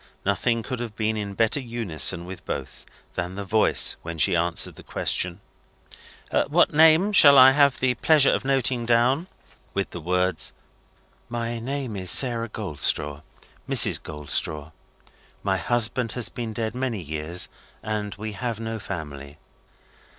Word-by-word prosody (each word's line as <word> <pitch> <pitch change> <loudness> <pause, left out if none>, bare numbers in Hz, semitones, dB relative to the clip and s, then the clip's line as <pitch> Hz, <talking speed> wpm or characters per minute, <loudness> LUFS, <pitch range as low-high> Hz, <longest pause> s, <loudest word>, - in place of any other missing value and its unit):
Nothing 115 +4 0
could 125 -1 -5
have 115 -3 -6
been 110 0 -1
in 100 -2 -5
better 115 +6 +1
unison 110 - -1
with 95 +1 -9
both, 65 -2 -7 0.3
than 90 +1 -5
her 100 - -4
voice 105 +3 +2
when 85 0 -7
she 75 - +2
answered 85 0 0
the - - -14
question: 90 -1 -1 1.1
"What - - +3
name 160 +6 +5
shall 140 -7 +8
I 130 0 +9
have 140 -1 +3
the 130 -1 +1
pleasure 145 +3 +4
of - - -1
noting 130 -3 0
down?" 125 +8 +2 0.5
with 100 0 -2
the 85 - -7
words, 90 +1 -1 0.8
"My 115 0 -3
name 130 -1 -4
is 95 -2 -3
Sarah 115 +1 +3
Goldstraw. 75 -7 -2 0.5
Mrs. - - +6
Goldstraw. 75 0 -3 0.7
My 95 -1 0
husband 115 +4 0
has 120 -3 -1
been 115 -2 -5
dead 110 0 -3
many 125 -4 -3
years, 80 +2 -3 0.4
and 105 -1 -4
we 110 +2 -6
had 115 +2 -4
no 115 0 -5
family." 75 -7 -8
110 Hz, 145 wpm, -24 LUFS, 90-120 Hz, 1.1 s, I